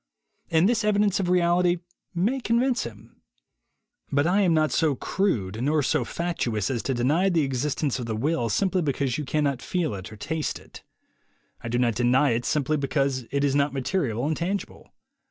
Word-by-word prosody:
And 165 +1 +4
this 230 -1 +1
evidence 205 -2 +2
of 185 -2 -1
reality 175 0 +3 0.4
may 215 +10 +1
convince 245 +1 +1
him. - - -12 0.9
But 145 +1 +2
I 185 +4 +3
am 185 -3 +3
not 155 -1 +2
so 155 -4 +2
crude 115 - -1
nor 150 +2 +2
so - - +1
fatuous 125 - -2
as 120 -3 -1
to 135 - -2
deny 150 +11 +2
the 165 -4 +2
existence 135 +1 -1
of 120 - -5
the 110 - -2
will 120 0 0
simply 190 - +1
because 140 -3 -1
you 150 - -3
cannot 140 -2 0
feel 175 - -1
it 95 0 -7
on 110 - -10
taste 160 +8 -3
it. - - -14 0.8
I 115 - -4
do 120 - 0
not 120 -2 +2
deny 125 +4 +3
it 115 +1 -1
simply 150 +1 +1
because 135 -2 -1
it 140 +1 -1
is 140 -1 +2
not 140 0 +1
material 135 - -1
and 155 +1 0
tangible. 190 +5 -4
150 Hz, 185 wpm, -25 LUFS, 125-175 Hz, 0.9 s, And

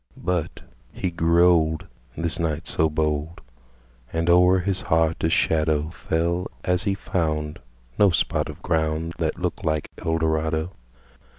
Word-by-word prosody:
But 90 -4 -2 0.3
he 90 - -3
grew 85 +1 +4
old 80 -3 +2 0.3
This 85 +1 -1
knight 80 0 -1
so 80 0 +1
bold 75 +1 -1 0.7
And 85 +1 +1
o'er 90 +1 +6
his 95 0 -1
heart 80 0 +1
a - - +4
shadowFell 80 +2 0 0.2
as 90 +1 0
he 100 -1 +1
foundNo 75 -4 -1
spot - - 0
of - - -10
groundThat 80 0 -1
looked 90 -1 -3
like 80 -2 -1
Eldorado. 80 0 0
80 Hz, 120 wpm, -24 LUFS, 80-85 Hz, 0.7 s, o'er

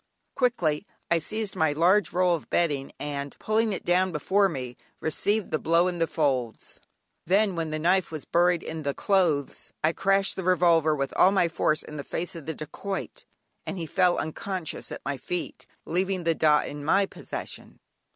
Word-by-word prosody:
Quickly 205 - +1 0.2
I 170 - +4
seized 215 +4 -3
my 160 -4 +2
large 180 +7 +3
roll 180 0 +3
of 165 - -4
bedding, 145 -5 0
and 140 -1 -5
pulling 220 +1 +1
it 195 - -4
down 185 +1 +3
before 195 +6 +2
me 125 -6 -5 0.2
received 205 +6 0
the 155 - 0
blow 170 +2 +3
in 175 -1 -3
the 165 - +2
folds; 130 -8 -2 0.5
then 195 +1 +3
when 165 -1 -2
the 155 - -2
knife 180 +4 +2
was 155 -3 -6
buried 175 0 +2
in 160 0 -5
the 140 -2 -2
clothes, 170 -8 0
I 160 +2 +3
crashed 195 +1 +1
the 190 - -3
revolver 170 -4 +4
with 140 -1 -2
all 185 - +7
my 190 -3 +3
force 155 -2 0
in 150 - -9
the 140 - -4
face 175 +5 -4
of 160 -3 -9
the 160 - -3
dacoit, 190 +6 -6 0.4
and - - -5
he 170 - -3
fell 180 +2 +2
unconscious 175 +1 -4
at - - -7
my 140 - -2
feet, 175 +7 -5 0.2
leaving 185 +1 -1
the 165 0 +2
"dah" 150 -2 +4
in 145 0 -7
my 195 +6 +3
possession. - - -8
170 Hz, 185 wpm, -26 LUFS, 155-190 Hz, 0.5 s, all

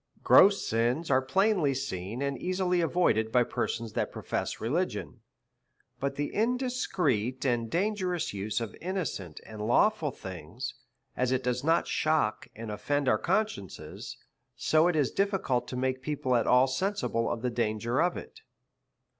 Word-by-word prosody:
Gross 200 0 +6
sins 120 +8 0
are 130 0 +4
plainly 175 0 +2
seen, 120 -2 -4
and 140 0 -1
easily 180 +3 0
avoided 135 -11 +2
by 125 0 +4
persons 115 -1 -3
that - - -1
profess - - -3
religion; 145 +1 -2 0.8
but 140 0 -2
the 145 +1 -3
indiscreet 195 - 0
and 120 -3 +1
dangerous 185 - -1
use 105 +2 -2
of 115 -4 -5
innocent 160 - -4
and 110 -1 -8
lawful 170 - +3
things, 95 - -7 0.4
as 125 0 0
it 130 0 +1
does 125 +1 -1
not 165 +2 +3
shock 155 -9 0
and 115 -1 -6
oflend 140 +7 -1
our 110 - +3
conscience, 190 - -3 0.4
so 155 +2 +3
it 175 - +1
is 145 -5 +2
difficult 195 -12 0
to - - -5
make 130 0 -1
people 135 -3 -1
at 120 - +2
all 125 +1 +6
sensible 135 - -1
of 115 - -3
the 125 - 0
danger 115 +2 0
of 175 +1 +1
it. - - -10
130 Hz, 150 wpm, -29 LUFS, 115-180 Hz, 0.8 s, Gross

